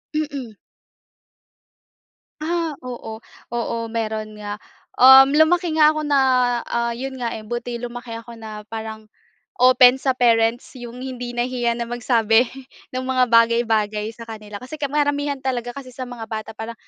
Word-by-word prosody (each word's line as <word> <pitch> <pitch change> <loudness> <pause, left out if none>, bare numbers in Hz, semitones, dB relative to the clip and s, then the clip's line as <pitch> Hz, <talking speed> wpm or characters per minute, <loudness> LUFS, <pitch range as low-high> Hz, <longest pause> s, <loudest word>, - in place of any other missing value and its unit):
Mm. 280 -7 -4 1.9
Ah, 330 0 -1
oo. 235 -3 -7 0.3
Oo 235 -1 -2
meron 220 -1 -4
nga, 210 -1 -6 0.4
um, 265 +1 +9
lumaki 315 +3 +3
nga 305 0 +6
ako 310 - -2
na, 290 -2 +2 0.5
ah, 235 0 -1
yun 265 +2 -5
nga, 235 - -1
eh, 215 - -10
buti 240 +1 -4
lumaki 240 -1 -7
ako 230 +1 -11
na 215 -2 -9
parang, 220 0 -7 0.6
open 255 0 +7
sa 265 -2 0
parents 230 -1 +2
iyong 245 0 -8
hindi 245 -2 -6
nahihiya 240 -1 0
na 235 - -2
magsabi 235 -1 +2 0.4
ng 255 0 -4
mga 255 -1 +2
bagay, 230 0 +5
bagay 210 -1 0
sa 230 0 -11
kanila. 215 -2 -9
Kasi 260 +7 -10
karamihan 290 0 0
talaga 245 -2 -3
kasi 260 -2 -9
sa 255 - -7
mga 240 -2 -7
bata 220 0 -6
parang 225 +1 -6
240 Hz, 150 wpm, -21 LUFS, 225-265 Hz, 1.9 s, um